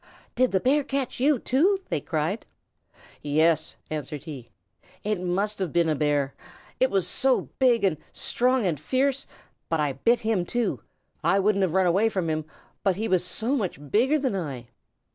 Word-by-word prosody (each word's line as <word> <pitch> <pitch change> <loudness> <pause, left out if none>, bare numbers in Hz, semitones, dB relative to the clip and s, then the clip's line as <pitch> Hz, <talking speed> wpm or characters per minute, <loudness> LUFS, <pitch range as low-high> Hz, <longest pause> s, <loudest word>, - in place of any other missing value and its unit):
"Did 255 0 +2
the 190 - +2
Bear 280 +7 +2
catch 270 -2 -3
you, 285 +2 +4
too?" 335 - +2
they - - -1
cried. 160 +6 -2 0.7
"Yes," 155 +2 +2 0.2
answered 150 -1 -4
he. 140 -7 -8 0.5
"It 210 -3 -1
must 195 +4 -1
have 185 -5 -2
been 170 -1 +2
a - - +3
Bear. 145 -2 0 0.5
It 260 - +4
was 190 -5 +1
so 260 +7 +1
big 245 -4 +4
and 185 -6 +2
strong 250 -1 +1
and 165 -6 0
fierce. 270 - 0 0.4
But 165 - 0
I 150 -2 +1
bit 230 - +2
him, 220 -5 +1
too. 240 +6 -1 0.4
I - - +3
wouldn't 200 0 +2
have 185 -2 +1
run 190 -1 +4
away 195 +6 +3
from 185 -6 -1
him, 155 -1 -2 0.4
only 190 -3 +2
he 225 - 0
was 185 -3 +2
so 220 +9 -1
much 170 - -4
bigger 260 +8 +3
than 265 -8 -1
I." 135 -10 -5
190 Hz, 180 wpm, -26 LUFS, 160-245 Hz, 0.7 s, you